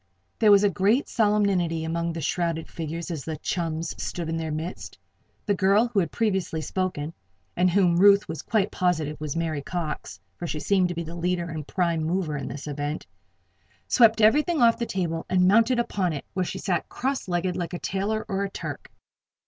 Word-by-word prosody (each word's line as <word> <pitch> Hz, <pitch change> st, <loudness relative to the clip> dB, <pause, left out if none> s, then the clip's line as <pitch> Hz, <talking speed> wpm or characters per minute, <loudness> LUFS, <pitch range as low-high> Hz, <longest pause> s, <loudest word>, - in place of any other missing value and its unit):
There 215 Hz, -, +5 dB
was 205 Hz, 0 st, +7 dB
great 205 Hz, -, +2 dB
solemnity 200 Hz, -7 st, +1 dB
among 170 Hz, +1 st, -1 dB
the 165 Hz, -, -5 dB
shrouded 165 Hz, +1 st, -1 dB
figures 165 Hz, +2 st, -5 dB
as 155 Hz, -5 st, -4 dB
the 160 Hz, -1 st, -4 dB
chums 165 Hz, 0 st, -2 dB
stood 170 Hz, -2 st, -4 dB
in 165 Hz, -, -1 dB
their 160 Hz, -1 st, -3 dB
midst. 160 Hz, +4 st, -5 dB, 0.5 s
The 205 Hz, -, +2 dB
girl 200 Hz, +4 st, +3 dB
who 220 Hz, -4 st, +1 dB
had 170 Hz, -5 st, 0 dB
previously 190 Hz, -7 st, 0 dB
spoken 160 Hz, -1 st, -3 dB, 0.4 s
(and 180 Hz, +1 st, +3 dB
whom 175 Hz, -2 st, +3 dB
Ruth 200 Hz, +2 st, +6 dB
was 160 Hz, -, -5 dB
quite 210 Hz, -2 st, 0 dB
positive 160 Hz, -5 st, -1 dB
was 150 Hz, -1 st, -3 dB
Mary 160 Hz, -3 st, -1 dB
Cox 155 Hz, -, -5 dB, 0.2 s
for 175 Hz, -, -5 dB
she 155 Hz, -, -3 dB
seemed 185 Hz, +1 st, +2 dB
to 175 Hz, -, -4 dB
be 170 Hz, -, -3 dB
the 165 Hz, +1 st, -8 dB
leader 175 Hz, 0 st, -1 dB
and 155 Hz, -3 st, -6 dB
prime 170 Hz, -3 st, 0 dB
mover 165 Hz, -2 st, -1 dB
in 140 Hz, -2 st, -4 dB
this 145 Hz, -, -6 dB
event) 145 Hz, +1 st, -4 dB, 0.8 s
swept 225 Hz, -2 st, +5 dB
everything 300 Hz, +9 st, +4 dB
off 235 Hz, -1 st, +5 dB
the 235 Hz, -, -1 dB
table 165 Hz, -3 st, -2 dB
and 180 Hz, -1 st, +4 dB
mounted 230 Hz, +5 st, +4 dB
upon 195 Hz, -7 st, 0 dB
it, 145 Hz, -, -6 dB
where 185 Hz, -1 st, 0 dB
she -, -, -5 dB
sat 175 Hz, -5 st, -1 dB
cross 265 Hz, -2 st, -2 dB
legged 180 Hz, 0 st, -1 dB
like 175 Hz, -1 st, -4 dB
a -, -, -2 dB
tailor, 200 Hz, +5 st, -2 dB
or 195 Hz, -2 st, -1 dB
a 200 Hz, -, -2 dB
Turk. -, -, -7 dB
175 Hz, 195 wpm, -25 LUFS, 160-200 Hz, 0.8 s, was